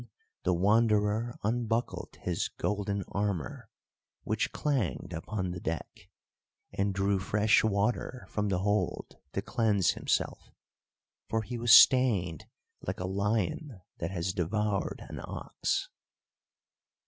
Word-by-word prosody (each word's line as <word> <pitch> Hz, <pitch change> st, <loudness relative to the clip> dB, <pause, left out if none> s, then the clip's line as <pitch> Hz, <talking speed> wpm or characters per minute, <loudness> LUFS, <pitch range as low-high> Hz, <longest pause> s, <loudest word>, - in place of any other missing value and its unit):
Then -, -, -14 dB, 0.4 s
the -, -, +3 dB
Wanderer 105 Hz, +3 st, +2 dB
unbuckled 115 Hz, +1 st, -1 dB
his 90 Hz, -2 st, -1 dB
golden 100 Hz, -1 st, -2 dB
armour, 100 Hz, -8 st, -3 dB, 0.5 s
which -, -, -1 dB
clanged 135 Hz, -, -1 dB
upon 95 Hz, +2 st, -3 dB
the 90 Hz, -, -5 dB
deck, 85 Hz, +3 st, -5 dB, 0.6 s
and 100 Hz, +1 st, 0 dB
drew 100 Hz, 0 st, +1 dB
fresh 105 Hz, +3 st, +3 dB
water 110 Hz, +4 st, 0 dB
from 105 Hz, -1 st, -1 dB
the 95 Hz, -, +1 dB
hold 105 Hz, -2 st, -1 dB, 0.2 s
to -, -, -2 dB
cleanse 105 Hz, -6 st, +2 dB
himself, -, -, -1 dB, 0.8 s
for 110 Hz, 0 st, 0 dB
he 120 Hz, +2 st, -5 dB
was 120 Hz, 0 st, +2 dB
stained 105 Hz, -, +6 dB, 0.3 s
like -, -, -4 dB
a 90 Hz, -, -2 dB
lion 105 Hz, -, -1 dB, 0.2 s
that 85 Hz, -, -2 dB
has 90 Hz, -1 st, -2 dB
devoured 100 Hz, +3 st, -1 dB
an -, -, -7 dB
ox. -, -, -2 dB
105 Hz, 120 wpm, -30 LUFS, 95-110 Hz, 0.8 s, stained